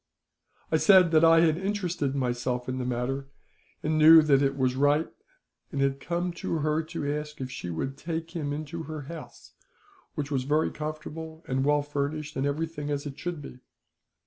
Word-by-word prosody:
"' - - -38
"I - - +4
said 185 -4 +6
that 160 0 +5
I 165 0 +7
had 165 0 +3
interested 180 -8 -1
myself 125 -1 -1
in 130 0 -2
the 125 - -2
matter, 125 +3 -2 0.6
and 155 0 +1
knew 160 +1 +9
that 140 -2 +4
it 135 0 +1
was 130 -1 +1
right, 145 +3 +3 0.6
and 140 - -3
had 135 0 +1
come 175 +4 -2
to 165 - -1
her 155 +1 +1
to 155 -3 -3
ask 150 0 -6
her 130 - -4
if 130 - -9
she 90 -8 -6
would 135 +12 -3
take 165 0 -4
him 155 -5 -3
into 155 +3 -5
her 155 -1 -6
house, 160 +4 -10 0.6
which 150 -1 -3
was 135 -2 0
very 150 +4 +1
comfortable 155 +1 -7
and 130 +1 0
well 145 0 +3
furnished, 145 +1 -3
and 135 +1 0
everything 150 0 -3
as 145 0 -2
it 140 -1 -7
should 175 -4 -4
be. 125 - -10
150 Hz, 195 wpm, -27 LUFS, 135-160 Hz, 0.6 s, knew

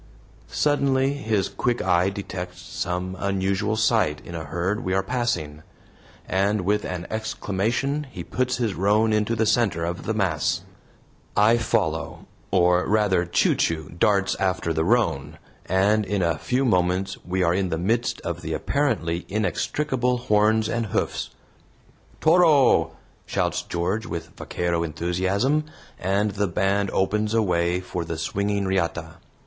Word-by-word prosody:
Suddenly 140 -2 +1
his 110 -8 0
quick 120 -1 -1
eye 90 0 +2
detects 95 -2 -6
some 90 +1 -4
unusual 100 +2 0
sight 110 -9 +2
in 85 - -8
a 80 -2 -5
herd 90 - -2
we 95 - 0
are 95 - +1
passing, 95 -11 -2 0.7
and 100 +2 +1
with 105 +3 0
an 90 -1 -4
exclamation 110 +6 -1
he - - -7
puts 130 0 -1
his 115 -5 0
roan 105 +4 +2
into 105 +2 +1
the 110 0 +1
center 105 -8 +1
of 85 +1 -4
the 110 - 0
mass. 90 -2 0 0.8
I 110 +3 +5
follow, 80 -9 -1 0.2
or 90 -1 +3
rather 100 -4 +2
Chu 85 - +2
Chu 80 -2 -1
darts 100 +2 +2
after 95 -3 0
the 80 0 0
roan, 80 - +1 0.3
and 100 +4 +3
in 100 -1 -1
a 85 -3 0
few 130 +2 0
moments 90 -2 +1
we 95 +1 -1
are 85 0 +3
in 95 0 0
the 80 - -1
midst 110 +8 0
of - - -5
apparently 85 +2 -1
inextricable 125 +4 0
horns 110 -2 +2
and 115 -1 -1
hoofs. - - -2 0.9
"TORO!" 150 - +5 0.3
shouts - - 0
George, 90 +6 -2
with 80 -1 -6
vaquero 85 -1 -2
enthusiasm, 95 - 0 0.3
and 100 +3 +1
the 100 0 -1
band 95 +3 +1
opens 105 +3 0
a 115 - +3
way 85 -1 +1
for 90 -1 -4
the 80 -1 -5
swinging 100 +5 -1
riata. 85 -3 -2
95 Hz, 145 wpm, -24 LUFS, 90-110 Hz, 0.9 s, I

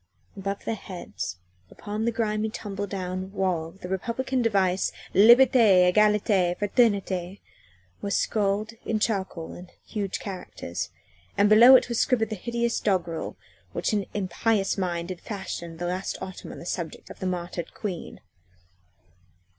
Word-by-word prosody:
Above 195 0 -4
their - - 0
heads 180 - -6 0.3
upon 210 +1 -4
the 235 - +2
grimy, 220 -1 -1
tumble 205 -2 -5
down 185 0 -4
wall 180 -5 0
the 180 +1 -10
Republican 235 +7 -1
device 195 -5 +2 0.2
"Liberté! 215 -4 +7
Egalité! 210 -4 +3
Fraternité!" 200 -4 +1 0.6
was 200 0 -1
scrawled 210 0 0
in 225 - 0
charcoal 195 -6 -2
in 180 0 -11 0.2
huge 200 -3 -3
characters, 180 - -5 0.5
and 205 +1 +5
below 235 +5 +9
it - - +5
was 235 -2 -1
scribbled 225 -5 +2
the 215 - -3
hideous 235 +3 -1
doggrel 170 -5 -1 0.4
which - - -1
an 205 -2 0
impious 200 +1 +1
mind 175 -2 -2
had 180 - -7
fashioned 170 -5 -6
last 180 +2 -2
autumn 185 - -7
on - - -9
the - - -9
subject 170 -2 -5
of - - -12
the 185 - -2
martyred 175 -2 -4
Queen. 190 -6 -5
195 Hz, 140 wpm, -26 LUFS, 180-215 Hz, 0.6 s, below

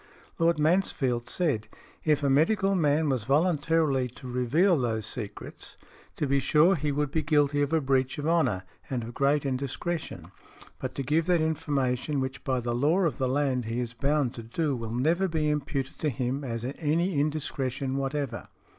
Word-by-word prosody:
Lord 165 -1 +3
Mansfield 150 -7 +1
said, 145 -12 0 0.4
"If 150 -2 +2
a 140 - +3
medical 195 +7 +3
man 155 -3 +2
was 130 -6 0
voluntarily 150 -2 +2
to 125 +1 -11
reveal 130 +10 +2
those 110 -3 -1
secrets, 110 -3 -7 0.4
to - - -1
be 140 0 +2
sure 150 +7 +4
he 150 -4 -1
would 145 0 -1
be 160 - +1
guilty 145 -1 +2
of 145 0 0
a 160 - +3
breach 130 -1 +1
of 145 +1 -3
honour 160 - +2 0.3
and 125 -3 -2
of 115 +2 -7
great 140 +2 +2
indiscretion, 135 - -3 0.5
but 130 0 -5
to 140 - -2
give 155 +5 +1
that 175 -2 +4
information 145 -3 0
which 130 0 -4
by 130 -2 0
the 120 0 -2
law 150 +10 +2
of 165 -6 0
the 130 -1 +1
land 130 -3 0
he 115 +2 -2
is 120 -1 -3
bound 140 0 0
to 115 - -7
do 140 +6 -1
will 115 -2 -5
never 160 +10 +1
be 155 -3 0
imputed 140 -2 -3
to 155 - +1
him 130 +2 -2
as 115 -2 -4
any 155 +4 0
indiscretion 135 -3 -2
whatever". 135 -2 -3
140 Hz, 180 wpm, -28 LUFS, 125-155 Hz, 0.5 s, sure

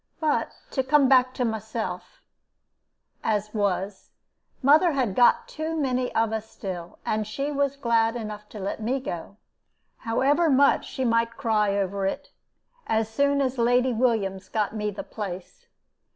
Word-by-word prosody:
But 310 -2 0 0.2
to 265 - +1
come 280 +1 +4
back 255 -1 +5
to 250 - 0
myself, 220 - -5 1.0
as 215 -1 -1
was 200 -2 -2 0.5
mother 310 +5 +5
had 255 -8 0
got 240 +4 +4
too 315 +1 -4
many 255 -4 0
of 225 -1 +2
us 220 0 -4
still, 175 -4 -7
and 215 -1 -1
she 275 +7 -3
was 280 -1 0
glad 230 -3 +2
enough 210 -2 -6
to 215 - -9
let 200 +3 -4
me 250 +5 0
go, 195 -5 -6 0.6
however 280 +8 +2
much 280 0 +4
she 260 - -3
might 230 0 +1
cry 215 -6 +1
over 195 0 -1
it, - - -5 0.6
as 220 0 +1
soon 280 +4 +2
as 260 -2 -1
Lady 245 +2 +3
Williams 220 -5 0
got 215 -2 -1
me 210 -1 -1
the 205 - -6
place. 200 - -7
230 Hz, 150 wpm, -25 LUFS, 210-265 Hz, 1.0 s, back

